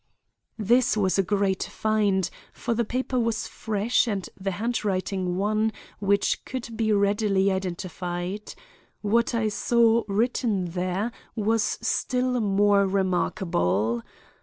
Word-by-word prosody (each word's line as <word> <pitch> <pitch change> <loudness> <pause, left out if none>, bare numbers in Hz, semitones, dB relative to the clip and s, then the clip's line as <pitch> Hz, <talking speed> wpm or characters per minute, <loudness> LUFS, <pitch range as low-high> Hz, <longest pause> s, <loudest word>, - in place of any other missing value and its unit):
This 230 +2 +3
was 195 -1 +2
a - - +7
great 195 -1 0
find, 205 -4 +1 0.2
for 235 - -2
the 235 +1 +1
paper 255 +3 -1
was 230 -2 0
fresh 220 +3 0
and 200 -4 -2
the 195 0 -3
handwriting 195 -5 -1
one 215 +2 +1 0.3
which 200 0 +1
could 240 -3 -6
be 220 -1 +1
readily 200 -1 +2
identified. 180 +1 -4 0.5
What 230 +3 +2
I 225 -2 +1
saw 230 +1 +3
written 210 -3 0
there 185 +5 -1 0.2
was 220 0 +1
still 250 -1 0
more 200 -1 +3
remarkable. 145 - 0
205 Hz, 115 wpm, -26 LUFS, 190-225 Hz, 0.5 s, a